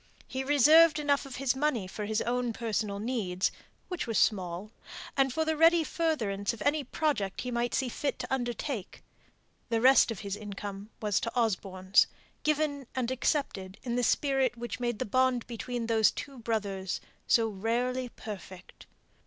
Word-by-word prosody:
He 260 +1 -3
reserved 300 +4 +6
enough 285 -2 +1
of 265 0 -1
money 265 -7 0
for 205 +3 -5
his 215 +1 0
own 245 -1 -1
personal 215 -3 -2
needs, 205 -5 -1 0.4
which 360 -8 -4
were 225 - -2
small, 185 0 +1 0.4
and 270 -1 +3
for 320 +5 0
the 315 0 +1
ready 330 +1 +5
furtherance 235 - -1
of 225 - -10
any 290 +1 +2
project 255 -8 -1
he 250 - -4
might 240 0 0
see 265 - +1
fit 280 +4 -2
to - - -4
undertake; 240 -3 -3 0.7
the 230 -1 +1
rest 260 +2 +6
of 225 -5 -4
his 200 -1 -3
income 205 -1 -7
was 210 -2 +1
Osborne's; 190 -4 +2 0.3
given 300 -3 0
and 255 -1 -1
accepted 240 -8 -1
in 240 -2 -2
the 245 - +1
spirit 265 -1 +2
which 240 -1 -5
made 240 -2 -1
the - - -2
bond 255 +2 +2
between 240 0 -4
these 220 -2 +4
two 280 -3 -7
brothers 200 -5 -2 0.3
so 230 -1 +4
rarely 245 +5 -1
perfect. 190 -5 -10
240 Hz, 160 wpm, -30 LUFS, 210-270 Hz, 0.7 s, reserved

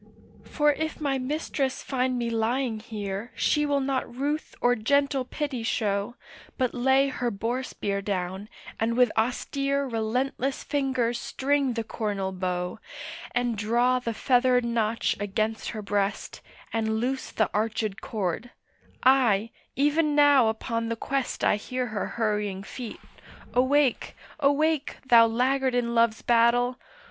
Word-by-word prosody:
For 295 0 +2
if 315 +1 -4
my 275 -3 0
mistress 275 0 -2
find 255 -1 0
me 235 -1 -1
lying 230 +1 0
here 210 -1 -5
She 295 0 +2
will 285 -1 +2
not 265 -2 -1
ruth 290 +4 -2
or 245 - +4
gentle 275 +4 +1
pity 280 -3 -3
show, 210 0 -1 0.4
But 255 -3 0
lay 265 +2 +3
her 245 -2 -2
boar 230 +4 -2
spear 200 -6 -3
down, 190 +1 -3 0.3
and 230 +1 0
with 250 -3 +5
austere 275 +4 0
Relentless 250 +3 -1
fingers 260 -4 0
string 275 -1 0
the 230 -1 -2
cornel 205 -4 -3
bow, 180 -1 -3 0.6
And 245 -1 +1
draw 240 +4 +2
the 230 -2 -4
feathered 250 0 +3
notch 230 -1 0
against 215 +2 -2
her 215 -2 -5
breast, 200 0 -2 0.3
And 220 -1 0
loose 260 +3 -2
the 220 - 0
archèd 215 -1 -1
cord; 210 +2 -3 0.5
aye, 235 -5 +4 0.2
even 295 +2 +2
now 285 -5 +6
upon 230 +1 -2
the 230 - -1
quest 270 +3 -2
I - - +4
hear 255 +4 -3
her 215 -4 -3
hurrying 210 -4 -1
feet,—awake, 255 +4 -2 0.2
awake, 295 +1 +1
Thou 235 -3 +7
laggard 255 +3 +1
in 235 -1 0
love's 230 -1 +2
battle! 240 +1 +3
240 Hz, 135 wpm, -26 LUFS, 220-270 Hz, 0.6 s, Thou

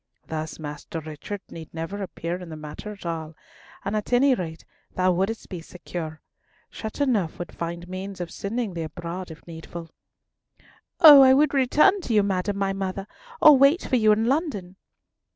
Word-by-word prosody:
Thus, 155 0 -5
Master 150 +1 -6
Richard 155 +6 -7
need 160 -2 -9
never 165 +5 -4
appear 175 -2 -4
in 180 - -9
the 160 - -7
matter 155 +7 -8
at 200 -3 -12
all, 160 -2 -4 0.5
and 200 - -1
at 210 +2 -3
any 260 +2 +5
rate 165 -7 -5 0.3
thou 185 0 +3
wouldst 195 +6 -1
be 180 -4 -7
secure. 165 -2 -7 0.5
Chateauneuf 220 - -1
would 175 - -6
find 170 +1 -5
means 190 +1 -6
of 175 -1 -5
sending 220 0 -3
thee 170 - -4
abroad 170 +3 -6
if 160 0 -12
needful." 165 0 -9 1.1
"Oh! 295 -4 +11
I 260 0 +7
would 290 +1 +3
return 300 +9 +4
to 235 - -2
you, 210 - +5
madam 200 0 -1
my 195 -1 0
mother, 195 0 -4 0.4
or 300 -2 +10
wait 275 +6 +5
for 260 - 0
you 215 -3 +5
in 215 +1 +2
London." 245 - -1
185 Hz, 170 wpm, -25 LUFS, 165-225 Hz, 1.1 s, Oh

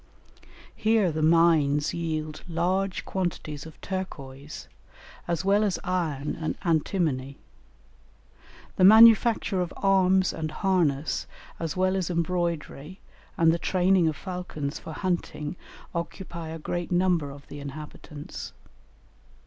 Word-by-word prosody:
Here 215 -5 +2
the 155 0 -3
mines 155 -3 +3
yield 155 -2 -3
large 185 +3 -1
quantities 160 -5 -3
of 160 - -14
turquoise, 145 -7 -6 0.6
as 170 +1 -1
well 200 +2 +4
as 200 -3 0
iron 160 -6 -2
and 155 - -2
antimony; 155 -5 0 1.4
the - - +3
manufacture 220 -1 +7
of 175 - -3
arms 190 -1 +3
and 155 -1 -3
harness 155 -7 0 0.3
as 165 0 -3
well 185 +1 +2
as 185 -3 -1
embroidery 170 -1 -2 0.4
and 165 -1 +5
the 170 - 0
training 185 -1 +3
of 155 - 0
falcons 180 -4 -5
for - - -9
hunting 175 -4 -3 0.4
occupy 170 -1 -5
a 165 - -5
great 175 +3 -4
number 175 -4 +2
of 140 0 -11
the 145 - -9
inhabitants. 145 +1 -8
170 Hz, 115 wpm, -26 LUFS, 155-185 Hz, 1.4 s, manufacture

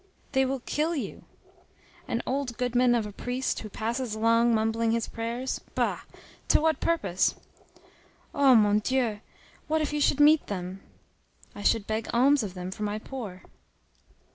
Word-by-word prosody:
"They 265 -1 +3
will 265 0 -2
kill 315 +6 -1
you." 280 - -5 0.8
"An 230 - -2
old 260 -3 -2
goodman 245 0 +2
of 225 -3 0
a 210 - -6
priest, 250 +5 -2
who 215 - -7
passes 230 +2 -3
along 230 +1 +3
mumbling 225 +1 +1
his 230 0 -1
prayers? 235 +3 -4
Bah! - - 0 0.5
To - - +5
what 315 -1 +1
purpose?" 195 - +1 1.0
"Oh, 275 -3 +5
mon 210 -1 +4
Dieu! 235 -2 0 0.5
what 315 +1 +1
if 300 -1 -2
you 295 - -1
should 285 - +2
meet 300 +1 +5
them!" 185 -1 -5 0.7
"I - - -9
should 205 0 +2
beg 220 +1 -2
alms 270 +4 +4
of 195 -4 -5
them 180 0 -5
for 200 - -9
my 210 0 -1
poor." 215 -6 -7
235 Hz, 160 wpm, -27 LUFS, 215-265 Hz, 1.0 s, To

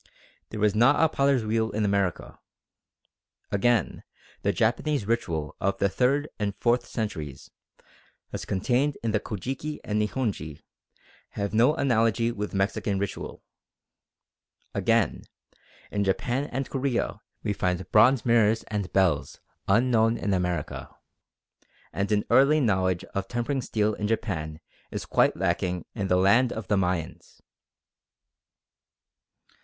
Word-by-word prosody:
There 110 - -6
was 105 -1 +3
not 120 +7 +4
a - - +6
potter's 140 -5 +1
wheel 110 +1 0
in 105 -1 -1
America. 100 -3 -1 1.1
Again, 110 +3 +1 0.4
the 100 - +1
Japanese 120 +4 0
ritual 85 - -2
of 100 +1 0
the 100 - +2
third 135 +7 +1
and 100 -1 -1
fourth 120 +1 +1
centuries, 80 - -5 0.8
as - - -4
contained 125 +9 0
in 115 - 0
the 105 - +1
Kojiki 130 - -5
and 105 0 0
Nihonji, 100 - -3 0.7
have 100 -1 -2
no 120 +7 +4
analogy 115 -4 +2
with 105 -2 -4
Mexican 100 +1 0
ritual. 100 0 -5 1.3
Again, - - +1 0.7
in 100 - 0
Japan 120 +8 0
and 135 -1 -3
Korea 130 -6 -2 0.2
we 105 - 0
find 90 -2 -2
bronze 115 +3 +5
mirrors 115 -2 +3
and 100 -4 -3
bells 80 -8 +1 0.3
unknown 115 +1 +3
in 100 - -1
America, 90 -4 -2 1.0
and 100 +2 -2
an 105 -1 +2
early 140 +3 +5
knowledge 95 - +1
of 100 -1 -2
tempering 120 +4 -2
steel 110 -2 0
in 105 0 -3
Japan 80 -8 -3 0.3
is - - -5
quite - - +2
lacking 90 -1 -1
in 100 - -2
the 90 - +3
land 110 +7 +4
of 110 -3 -6
the 105 - +3
Mayans. 90 -4 -2
105 Hz, 130 wpm, -26 LUFS, 95-120 Hz, 1.3 s, a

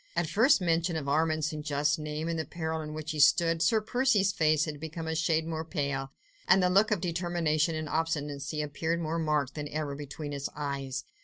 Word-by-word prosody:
At 170 0 +1
first 225 - +4
mention 170 0 +1
of 150 -3 -3
Armand 155 +1 +1
St. 155 -1 -3
Just's 150 0 +1
name 150 +1 -4
and 165 -1 -1
of - - 0
the - - -18
peril 160 -1 -3
in 150 0 -6
which 155 +1 -4
he 155 - -4
stood, 165 +3 +4
Sir 220 +2 +3
Percy's 220 -3 +2
face 155 -3 +2
had 150 -2 -6
become 160 +1 -6
a 160 - -2
shade 160 0 +1
more 160 -1 -3
pale; 140 -5 -2 0.4
and 190 - +5
the 180 - +3
look 200 +4 +4
of 210 -6 0
determination 170 -2 0
and 155 0 -3
obstinacy 150 -2 -2
appeared 160 +3 -2
more 165 0 -2
marked 150 -4 0
than 150 0 -5
ever 150 -1 -3
between 145 +1 -6
his 140 -1 -3
eyes. 140 -2 -3
160 Hz, 215 wpm, -29 LUFS, 150-170 Hz, 0.4 s, and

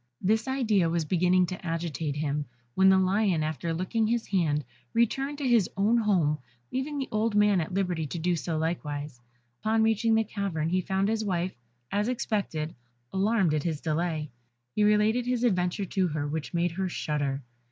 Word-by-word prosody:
This 220 +6 +1
idea 220 -10 +2
was 165 -1 0
beginning 180 +2 +3
to 180 0 -6
agitate 165 -3 -2
him, 145 -1 -1 0.3
when 190 +6 +5
the 190 - +6
lion, 190 -3 +2
after 155 +2 -2
licking 185 +7 0
his 235 0 0
hand, 155 -7 +1 0.3
returned 270 +5 +1
to 285 -2 -2
his 235 -6 +4
own 205 +4 +3
home, 180 -10 +2 0.3
leaving 275 +3 -2
the 270 - -2
old 215 0 0
man 210 -3 +4
at 160 - -5
liberty 180 -5 0
to 170 - -5
do 175 +2 +1
so 160 +1 -2
likewise. 150 -5 -3 0.4
Upon 220 +1 +2
reaching 225 +1 +3
the 225 - +3
cavern 195 -7 -2
he 185 +2 +1
found 190 +2 0
his 220 0 0
wife, 185 -2 -1 0.4
as 205 +2 +1
he 250 - +1
expected, 170 -10 -2 0.4
alarmed 195 -3 +2
at 155 - +1
his 160 -1 -2
delay; 155 -2 -1 0.4
he 210 - +2
related 210 +3 +3
his 250 -1 0
adventure 185 -3 +1
to 190 0 0
her, 150 -2 -2
which 155 +1 -4
made 175 0 +1
her 190 +2 -2
shudder. 145 -4 -2
185 Hz, 185 wpm, -28 LUFS, 160-215 Hz, 0.4 s, the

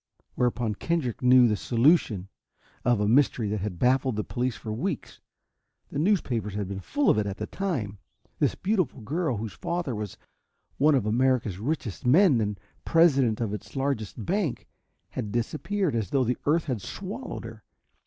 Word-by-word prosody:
Whereupon 120 -3 0
Kendrick 140 0 -2
knew 125 -1 +7
the 105 - +2
solution 115 - +2 0.6
of 120 -2 +3
a 105 - +1
mystery 120 -2 +3
that 105 +1 -1
had 100 -2 -4
baffled 130 +2 +2
the 105 - -1
police 125 0 -2
for 110 - -6
weeks. 145 - -4 0.7
The - - -2
newspapers 125 - 0
had 100 -2 -2
been 95 0 -5
full 285 - +2
of - - +2
it 105 - -1
at 100 - -4
the 110 - -3
time. 120 - -3 0.4
This - - +2
beautiful 185 - -1
girl, 150 +2 -1
whose 110 0 -5
father 170 -6 -3
was 105 -3 -5 0.6
one 150 +1 +5
of 125 -6 +1
America's 115 -4 +1
richest 120 - -3
men 145 - +5
and 105 -2 -2 0.2
president 140 -9 +4
of 110 -3 -2
its 105 - -8
largest 130 -6 -2
bank, 185 - -1 0.4
had 105 - -4
disappeared 155 - -1
as 110 -6 -1
though 135 - +2
the 125 +1 0
earth 160 +2 +3
had 125 -8 -2
swallowed 205 - -6
her. 110 -2 -10
125 Hz, 170 wpm, -27 LUFS, 105-155 Hz, 0.7 s, knew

